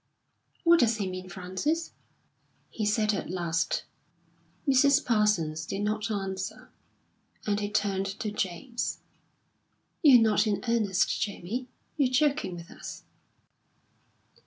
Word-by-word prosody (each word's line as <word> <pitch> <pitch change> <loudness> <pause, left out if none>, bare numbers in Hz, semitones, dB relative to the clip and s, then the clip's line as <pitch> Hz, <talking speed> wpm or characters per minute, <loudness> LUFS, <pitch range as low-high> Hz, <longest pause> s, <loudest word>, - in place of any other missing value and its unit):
"What 340 -1 +6
does 230 -3 +3
he 200 -3 -2
mean, 185 0 -6
Frances?" 190 - -2 0.8
he 215 -2 -2
said 215 0 +2
at 195 - -3
last. 170 -2 -1 0.8
Mrs. 280 +2 +5
Parsons 210 -9 +2
did 195 +5 -3
not 215 +1 -1
answer, 195 -2 -4 0.7
and 205 -1 +1
he 205 -1 -2
turned 200 -2 0
to 205 +2 -4
James. 210 +5 -3 1.0
"You're 275 -6 +8
not 220 0 +3
in 205 -1 0
earnest, 215 -5 +1
Jamie? 215 +5 -3 0.3
You're 275 -4 +3
joking 280 -7 +1
with 170 -1 -10
us?" - - -9
210 Hz, 115 wpm, -28 LUFS, 190-240 Hz, 1.0 s, You're